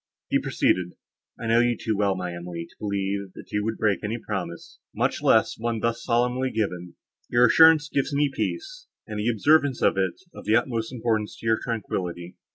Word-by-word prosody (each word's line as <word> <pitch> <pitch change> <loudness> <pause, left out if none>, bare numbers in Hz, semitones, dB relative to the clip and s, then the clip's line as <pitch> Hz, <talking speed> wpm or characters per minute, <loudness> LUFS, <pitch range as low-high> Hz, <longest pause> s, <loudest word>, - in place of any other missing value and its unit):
He - - +4
proceeded: 90 -1 0 0.5
"I - - -6
know 115 +1 +4
you 120 0 +2
too 110 - -1
well, 100 -1 +1
my 90 -1 -4
Emily, 85 -1 -6
to - - -23
believe, 100 -1 -2
that - - -12
you 105 0 0
would 110 +1 -2
break 105 -3 +1
any 110 +3 -2
promise, 95 -7 -6 0.2
much - - 0
less - - +3
one 115 0 -1
thus 115 +1 -1
solemnly 125 +2 +1
given; 90 -7 -3 0.3
your 120 +1 +5
assurance 160 +4 +6
gives 140 -1 -1
me 145 +1 +2
peace, - - -4 0.2
and 105 -2 -5
the 105 +3 +1
observance 140 +4 +3
of - - +3
it 95 -2 0
is 190 - -25
of - - -11
the 105 +2 +3
utmost 115 -1 0
importance 110 -4 -1
to - - -12
your 110 0 +2
tranquillity. 90 -6 -4
110 Hz, 195 wpm, -25 LUFS, 95-120 Hz, 0.5 s, assurance